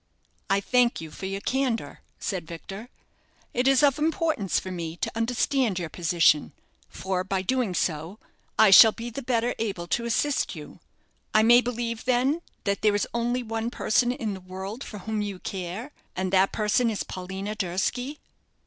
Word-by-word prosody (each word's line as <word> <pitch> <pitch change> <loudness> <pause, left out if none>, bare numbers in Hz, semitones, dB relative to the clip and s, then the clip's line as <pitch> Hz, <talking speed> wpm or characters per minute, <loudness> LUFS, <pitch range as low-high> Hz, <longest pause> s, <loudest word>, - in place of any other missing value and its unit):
"I 195 +1 +3
thank 245 +3 +2
you 160 -1 -8
for 190 - -6
your 195 +1 -4
candour," 255 -2 -1 0.2
said 180 -5 -4
Victor. 195 +7 -8 0.6
"It 245 +2 +1
is 270 +1 +5
of 285 0 +4
importance 310 - +1
for 185 - -7
me 170 -2 -5
to - - -2
understand 235 -1 0
your 170 -3 -3
position, 165 -3 +2 0.4
for, 190 -1 -2
by 190 0 -1
so - - -11
doing, 250 -7 0 0.8
I 220 -3 +6
shall 220 +3 +10
be 235 +1 -6
the 275 - -5
better 240 -1 0
able 200 -6 -2
to 235 - 0
assist 275 +5 0
you. - - -10 0.6
I 215 - +6
may 240 +2 +7
believe, 235 -2 -3
then, 260 +6 +2 0.2
that 200 -1 -1
there 210 -1 +3
is 205 - 0
only 240 +1 0
one 225 0 -3
person 240 +1 +1
in 225 -4 -3
the 190 - -8
world 190 +7 -7
for 210 - -8
whom 215 +2 -3
you 205 -2 -4
care, 190 +8 -5 0.2
and 185 0 -2
that 190 +1 +4
person 220 +3 +2
is 215 - -2
Paulina 190 +3 -5
Durski?" 215 - -2
220 Hz, 175 wpm, -26 LUFS, 190-245 Hz, 0.8 s, shall